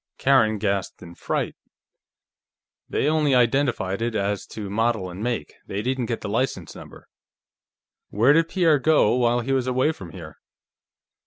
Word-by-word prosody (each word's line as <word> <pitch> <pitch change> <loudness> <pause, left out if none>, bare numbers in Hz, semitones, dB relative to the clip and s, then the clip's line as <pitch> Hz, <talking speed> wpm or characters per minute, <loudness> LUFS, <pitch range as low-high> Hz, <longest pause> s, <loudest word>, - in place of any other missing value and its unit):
Karen 110 -6 +3
gasped 100 -3 -2
in 85 -1 -11
fright. - - -3 1.4
"They - - 0
only 150 -3 +2
identified 120 -5 +1
it 115 -1 -2
as 100 -1 -2
to 105 -2 -7
model 110 -2 -1
and 90 +3 -8
make; 115 -10 -3
they 100 +2 -4
didn't 130 -1 -1
get 115 - -3
the - - -5
license 105 - -2
number... - - -13 1.0
Where 115 +8 +4
did 165 +1 +2
Pierre 165 -6 +3
go, 150 -6 +3
while 120 -1 +2
he 130 +3 -3
was 130 -2 +1
away 130 +4 +2
from 95 - -10
here?" 80 -3 -11
115 Hz, 155 wpm, -23 LUFS, 100-135 Hz, 1.4 s, Where